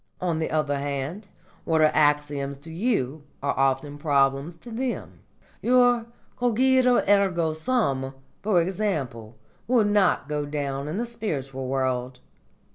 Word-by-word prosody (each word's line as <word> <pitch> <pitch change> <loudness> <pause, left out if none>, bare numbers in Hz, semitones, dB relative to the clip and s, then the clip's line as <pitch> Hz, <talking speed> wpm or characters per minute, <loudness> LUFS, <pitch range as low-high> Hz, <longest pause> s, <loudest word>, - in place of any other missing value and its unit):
On 170 -3 -1
the 160 - -1
other 150 -2 0
hand, 145 +8 -4 0.4
what 160 -1 +1
are 155 -1 +5
axioms 145 -2 +1
to 160 +2 -9
you 160 - -1 0.2
are 140 - +1
often 135 +2 0
problems 140 +1 +1
to 170 +8 -12
them. 250 +2 -4 0.4
Your 245 -1 +4 0.3
cogito 250 +1 +3
ergo 185 -5 +3
sum, 155 - 0 0.3
for 200 -4 +3
example, 145 - -3 0.3
will 235 -3 +4
not 205 -7 +2
go 150 -1 -2
down 140 -1 -3
in 155 +5 -3
the 235 - -1
spiritual 140 - -4
world. 130 -1 -1
155 Hz, 130 wpm, -25 LUFS, 140-210 Hz, 0.4 s, are